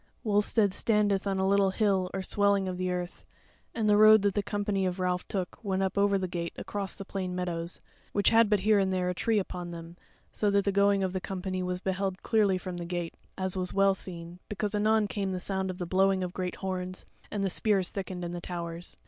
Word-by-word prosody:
Wulstead 205 -2 +2
standeth 205 -3 +1
on 195 -1 0
a 190 0 +1
little 200 0 +4
hill 190 -2 +1
or 190 - -3
swelling 200 -1 +2
of 180 -1 -4
the 185 0 -1
earth, 180 0 -4 0.5
and 225 -2 0
the 205 0 +5
road 215 0 +8
that 200 -1 +2
the 205 - +1
company 205 -1 -1
of 180 -1 -1
Ralph 180 -1 -1
took 190 +2 -4
went 195 -2 0
up 190 - 0
to 200 0 +3
the 185 -1 -2
gate 170 -1 -4
across 200 -2 -4
the 195 - -7
plain 185 -2 -4
meadows, 175 -1 -4 0.3
which 200 -1 +3
had 225 -1 +5
but 210 -3 +2
here 210 +1 +4
and 190 -1 +1
there 180 -1 0
a - - -3
tree 220 +5 +1
upon 180 -3 -3
them, 170 0 -9 0.4
so 210 - +1
that 200 0 +2
the 200 - +2
going 200 0 +3
of 190 -1 -1
the 185 - -2
company 185 0 -3
was 180 0 -3
beheld 190 0 -2
clearly 205 -4 +3
from 185 -1 -6
the 170 - -5
gate; 175 -1 -3 0.2
as 190 -1 -1
was 185 0 0
well 195 0 +5
seen, 175 -2 -6
because 210 0 -2
anon 215 +1 +3
came 195 -2 -2
the 185 - -2
sound 190 +1 -1
of 185 - -5
the 180 - -3
blowing 190 +1 +2
of 180 -1 -4
great 180 -1 -3
horns, 185 -1 -4 0.2
and 205 -2 -2
the - - +1
spears 195 -2 +1
thickened 185 -2 -5
in 170 - -4
the 175 0 -5
towers. 170 -1 -6
190 Hz, 235 wpm, -29 LUFS, 180-200 Hz, 0.5 s, road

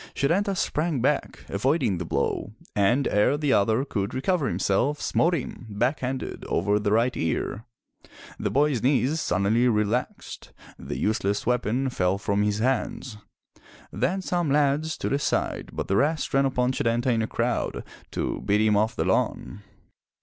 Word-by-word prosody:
Setanta 195 +8 +1
sprang 155 -5 0
back, - - -1
avoiding 105 - 0
the 90 - -4
blow, 80 +7 -2 0.2
and 120 +7 +2
ere 105 +8 +2
the 145 -3 +1
other 110 +6 +2
could 105 -5 -3
recover 150 +2 0
himself, 100 +11 0
smote 170 +2 +2
him, 125 -4 -6
back 120 +8 0
handed, 130 +1 -4
over 105 +4 +1
the 105 0 -1
right 115 +3 +2
ear. 95 +6 -2 0.7
The - - -1
boy's 140 -4 +2
knees 140 +4 +2
suddenly 100 +7 +2
relaxed; 110 +2 -2 0.3
the - - -5
useless 100 - 0
weapon 125 +2 0
fell 95 -4 +1
from 100 0 0
his 105 0 +1
hands. 125 -1 -1 0.7
Then 135 - -1
some 175 -3 -1
lads 150 +2 +2
stood - - -3
aside 140 - -1
but - - -4
the 100 - +1
rest 150 +3 0
ran 135 0 +4
upon 125 -1 +1
Setanta 120 +1 +1
in 115 -1 +1
a 110 - -1
crowd 120 +1 -2 0.3
to - - -3
beat 105 +1 +2
him 110 -1 +3
off 110 +2 +1
the - - -1
lawn. 100 - -1
125 Hz, 155 wpm, -25 LUFS, 105-140 Hz, 0.7 s, ran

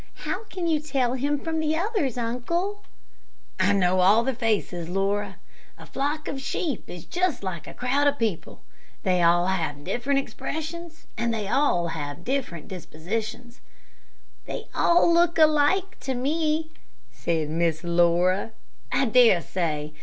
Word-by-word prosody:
"How 390 +4 -3
can 370 -4 -5
you 320 -2 +2
tell 270 -5 0
him 285 +3 0
from 320 +1 -2
the 310 0 +1
others, 355 - -1
uncle?" 340 - -2 0.8
"I 185 +2 +4
know 185 -2 +3
all 200 +5 +5
their 265 +2 0
faces, 210 -8 -1
Laura. 195 +1 -1 0.4
A - - -12
flock 295 +3 -2
of 270 - -4
sheep 280 - -3
is 175 -2 -8
just 355 - -1
like 185 -4 -5
a - - -9
crowd 275 +3 +1
of 285 0 +2
people. 220 - -3 0.4
They 185 -2 +2
all 175 +1 +4
have 160 -6 -1
different 245 - 0
expressions, 320 +3 -6
and 235 0 0
have 175 - 0
different 240 - -3
dispositions." 220 +8 -5 0.9
"They - - -5
all 340 0 +4
look 340 0 +3
alike 310 +5 +3
to 265 -1 -3
me," 310 +4 0 0.4
said 160 -3 -2
Miss 165 0 0
Laura. 175 +4 +2 0.4
"I 275 - +2
dare 230 -5 +6
say. 155 -4 -3
235 Hz, 140 wpm, -25 LUFS, -, 0.9 s, dare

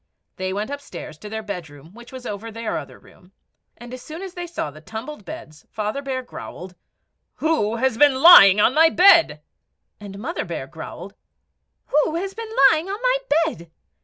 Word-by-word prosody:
They 185 0 -3
went 210 +6 -4
upstairs 280 - -9
to 210 - -9
their 220 0 -5
bedroom, 165 -6 -9
which 240 +2 -14
was 260 -1 -10
over 210 +1 -6
their 225 0 -4
other 145 - -12
room, 180 +2 -22 0.4
and 240 +1 -11
as 255 - -8
soon 320 +7 -9
as 380 -2 -8
they 350 -1 -6
saw 330 - -5
the 155 +2 -15
tumbled 220 - -8
beds 155 0 -11
Father 215 +5 -4
Bear 265 -2 -4
growled, 185 -6 -10 0.6
"WHO 300 -9 0
HAS 240 -1 -1
BEEN 290 -2 +5
LYING 260 - +8
ON 230 - +4
MY 320 +2 +5
BED?" 335 - +5 0.6
And 200 -1 -10
Mother 305 - -4
Bear - - -6
growled - - -10 0.7
"WHO 300 +2 +1
HAS 385 +3 -3
BEEN 450 +1 -7 0.2
LYING 325 +4 -2
ON 400 +2 -4
MY - - +2 0.3
BED?" 170 - -7
240 Hz, 180 wpm, -22 LUFS, 200-320 Hz, 0.7 s, LYING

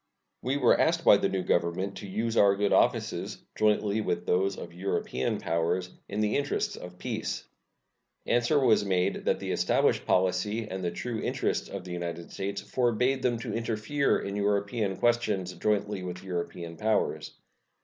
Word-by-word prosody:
We 130 +3 0
were 125 -4 +4
asked 165 +1 +2
by 100 - +8
the 100 - 0
new 95 -1 -1
Government 85 +4 0
to 100 - -7
use 110 +4 -2
our 100 -2 +5
good 100 0 +1
offices, - - +1 0.2
jointly 105 0 +2
with 85 -4 -2
those 95 +2 +1
of - - -8
European 90 -8 -1
powers, 85 +2 -1 0.2
in 105 +2 -2
the 105 0 +2
interests 140 - -1
of 90 0 -10
peace. - - -4 0.8
Answer 120 +5 +2
was 115 -6 +4
made 95 -1 0
that - - +2
the - - -3
established - - +2
policy 95 +4 +1
and 95 -1 -5
the 90 - +1
true 115 +5 -4
interests - - -1
of 100 -2 -6
the 90 - -8
United 85 -1 -5
States 100 +1 -3
forbade 125 +2 +1
them 120 -2 +1
to - - -4
interfere 115 +5 0
in 100 0 -4
European 100 0 0
questions 105 -6 +1
jointly 105 -2 0
with 90 0 -6
European 85 -2 -5
powers. 110 +2 0
100 Hz, 165 wpm, -28 LUFS, 90-115 Hz, 0.8 s, by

